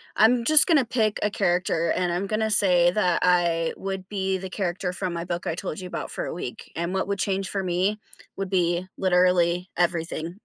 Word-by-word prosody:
I'm 235 +2 +4
just 310 +2 +9
gonna 295 -7 +3
pick 220 -3 0
a 210 - 0
character 175 -2 0
and 175 -1 -1
I'm 190 +3 -2
gonna 220 +1 -1
say 175 -4 +4
that 180 -3 0
I 170 -2 +1
would 190 -1 -6
be 190 -1 -2
the 190 0 -8
character 180 -1 -3
from 180 0 -3
my 170 0 -5
book 175 0 -4
I 165 - -2
told 155 - -5
you 185 - -7
about - - -5
for - - -2
a - - -5
week, 125 -8 -8
and 170 +2 -3
what 190 - -1
would 200 0 -2
change 195 0 -2
for 195 -1 -2
me 185 +4 -1 0.4
would 195 -1 -5
be 175 -1 0
literally 180 -1 +2
everything. 170 -1 -1
185 Hz, 205 wpm, -24 LUFS, 175-195 Hz, 0.4 s, just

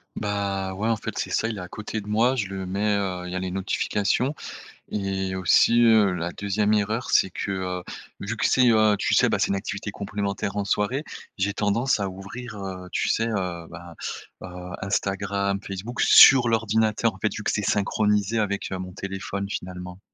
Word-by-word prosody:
Bah, 100 -2 -2
ouais. 105 +3 -2
En 115 - +3
fait, - - -6
c'est - - -2
ça. 110 - +1
Il 110 -3 -4
est - - -5
à 90 - -7
côté 110 +3 -5
de 105 - -10
moi, 115 +5 +2
je 110 -5 -1
le 95 -1 -5
mets, 100 +2 0
heu 90 -3 -2
il 90 - -6
y - - -4
a - - -1
les 95 0 -3
notifications 100 +7 0 0.6
et 95 -2 -2
aussi, 115 +5 +4
heu, 110 -4 +5
la 85 0 -3
2e 105 +1 0
erreur 110 +4 -1
c'est 95 - +4
que, 100 - -3
heu, 90 -1 -3 0.4
vu - - -4
que - - -1
c'est, 125 -1 +4
heu, 110 -1 +4
tu - - +1
sais, - - +5
ben, - - +1
c'est - - +1
une 100 - +1
activité 100 +1 -4
complémentaire 100 0 -3
en 100 - 0
soirée, 115 +9 0 0.3
j'ai 100 +1 0
tendance 110 +3 +1
à 100 - -1
ouvrir, 105 +5 -8
heu, 95 -2 -6
tu - - 0
sais, 115 +1 +1
heu, 90 -6 -3
bah, 85 0 -11 0.5
heu, - - -6 0.4
Instagram, 100 0 -1
Facebook, 100 +5 -5
sur 125 -3 +8
l'ordinateur, 110 0 +1
en 95 - -13
fait. 110 - 0
Vu 105 - -6
que - - +1
c'est 105 - -1
synchronisé 105 +2 +1
avec, 100 -2 -2
heu, 95 - -2
mon 90 0 -6
téléphone, 100 0 -5
finalement. 90 -1 -6
100 Hz, 205 wpm, -25 LUFS, 95-110 Hz, 0.6 s, sur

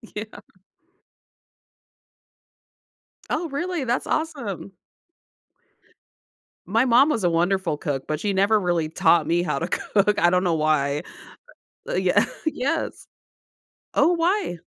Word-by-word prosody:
Yeah. 215 +1 -7 2.9
Oh, 325 +1 -1
really? 340 +1 -2
That's 240 +1 -1
awesome. 235 - -3 1.9
My 225 +5 +2
mom 255 +4 +5
was 225 -10 -1
a 175 - +3
wonderful 175 -1 0
cook, 140 -3 -3
but 155 0 -3
she 205 -1 -1
never 200 +3 +3
really 175 -4 0
taught 160 0 +3
me 170 +1 +1
how 150 -5 -1
to 170 - -3
cook. 210 0 +1
I 175 -3 +4
don't 180 +1 +2
know 170 -2 +2
why. 150 -1 +1 0.9
Yeah. - - +3 0.2
Yes 310 +1 -2 0.9
Oh, 290 - +4
why? 345 - 0
195 Hz, 115 wpm, -23 LUFS, 170-265 Hz, 2.9 s, mom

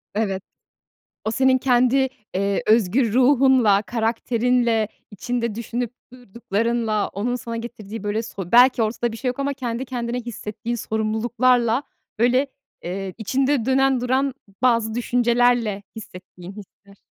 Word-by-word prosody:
Evet. 195 -3 -1 0.8
O 220 - 0
senin 260 +3 +3
kendi, 255 +1 +3 0.3
eee, 200 +1 0
özgür 220 +2 +3
ruhunla, 255 -5 +4
karakterinle, 230 0 0 0.2
içinde 235 +1 -3
düşünüp 235 +1 -3 0.2
durduklarınla, 230 -1 -2
onun 240 +6 -2
sana 230 -1 -6
getirdiği, 225 -2 -7
böyle, 210 +2 -1
so 195 -5 -8
belki 245 0 +6
ortada 230 +1 -1
bir - - -6
şey 255 +2 -3
yok 250 - -3
ama 280 0 -1
kendi 250 -2 -4
kendine 245 -1 -3
hissettiğin 230 0 -5
sorumluluklarla, 230 +3 +1 0.4
böyle, 250 +4 +3 0.4
eee, 190 +1 -5
içinde 265 +3 0
dönen 265 0 +2
duran 260 +2 0 0.3
bazı 230 -3 +2
düşüncelerle 240 -3 +1
hissettiğin 185 -3 -11
hisler. 200 -1 -15
235 Hz, 125 wpm, -22 LUFS, 215-250 Hz, 0.8 s, belki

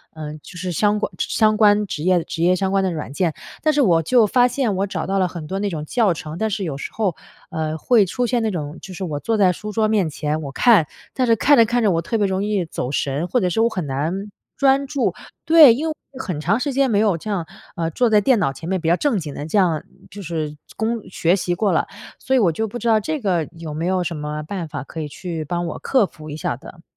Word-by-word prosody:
嗯， 155 -1 -7
就 180 - -11
是 180 +1 -3
相 210 +4 +2
关 - - -2
相 215 -1 +2
关 210 -1 +4
职 155 -5 -5
业 180 -2 +3
职 165 - -5
业 180 +1 +4
相 190 +1 -1
关 195 -1 +2
的 185 - 0
软 155 -4 -5
件， 165 0 0 0.3
但 310 0 +2
是 295 - +3
我 170 -9 +4
就 235 +7 +4
发 245 +3 +4
现 240 -5 -1
我 195 +2 0
找 - - -3
到 195 +1 -1
了 185 - +2
很 170 -3 -7
多 195 +3 -3
那 205 - -1
种 155 -4 -5
教 220 -1 +2
程。 155 0 -7
但 220 +2 0
是 200 - -2
有 155 -6 -3
时 - - -6
候， 200 -7 0 0.4
呃， 160 -2 -2
会 215 +5 +4
出 245 +7 -1
现 245 0 +1
那 220 - 0
种， 155 -3 -5
就 190 - -9
是 190 - -6
我 150 -5 -3
坐 225 +7 -1
在 190 -3 +5
书 210 +4 -6
桌 220 0 +1
面 205 -7 +1
前， 150 +1 -2
我 140 -3 -6
看， 200 - +4 0.3
但 255 - +1
是 230 - +5
看 285 +5 +4
着 230 - +7
看 240 +2 0
着 210 - +4
我 165 -1 +1
特 225 +7 -2
别 205 -2 +2
容 190 +1 -1
易 205 -3 0
走 130 -5 -4
神， 140 +3 -1
或 250 - +1
者 180 -4 +1
是 220 +6 +1
我 230 - +4
很 185 -8 -3
难 140 +5 -2 0.4
专 275 0 +3
注。 280 -2 0 0.3
对， 315 -7 +8
因 305 +7 -2
为 - - 0
我 - - -1 0.2
有 - - -5
很 180 -7 -4
长 195 +10 +1
时 285 0 -2
间 275 0 +2
没 205 - +3
有 205 -5 +2
这 215 - -8
样， 185 -5 -1 0.3
呃， 165 -1 -1
坐 240 +8 +2
在 215 - +5
电 245 +1 +3
脑 165 -8 +1
前 160 +4 -9
面 190 0 0
比 165 - -3
较 170 - +5
正 275 +1 +1
经 150 -4 -6
地 145 - -6
这 205 - 0
样 170 -5 +2 0.3
就 200 +2 -8
是 155 -3 -4 0.2
工 225 +1 -1
学 175 0 +2
习 175 -2 -1
过 205 +2 +1
了， - - +1 0.3
所 265 - 0
以 - - +5
我 185 -7 +3
就 220 +8 -2
不 220 - -6
知 235 0 -4
道 220 -1 +5
这 310 +8 -3
个 175 -6 0
有 160 -2 -6
没 165 +3 -3
有 185 -1 +1
什 170 0 -3
么 150 0 -4
办 175 +1 -5
法 150 - -6
可 160 - -7
以 150 - -4
去 165 +1 -5
帮 175 +2 -2
我 170 - -5
克 260 -6 +2
服 155 -4 -11
一 150 - -6
下 130 - -2
的？ 165 +4 -13
190 Hz, 300 characters per minute, -21 LUFS, 160-220 Hz, 0.4 s, 对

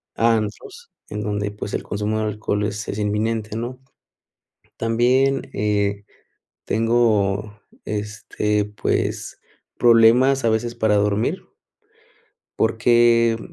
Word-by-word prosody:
a 115 0 +3
antros, 380 - -6 0.2
en 105 - -4
donde, 105 0 -2
pues, 105 0 -7
el - - -2
consumo 105 +1 -2
de 110 - -1
alcohol 105 -1 -2
es 105 +1 -4
es 100 - -4
inminente, 105 +1 -1
¿no? 120 +3 -5 1.0
También, 125 +4 +1
eh, 100 -1 -1 0.6
tengo, 105 -3 +1 0.2
este, 105 0 -2
pues, 105 0 -3 0.4
problemas 120 +3 +5
a - - +4
veces 115 +2 -1
para 110 -3 +1
dormir 105 +2 +1 1.2
porque, 115 0 +3
110 Hz, 105 wpm, -21 LUFS, 105-115 Hz, 1.2 s, problemas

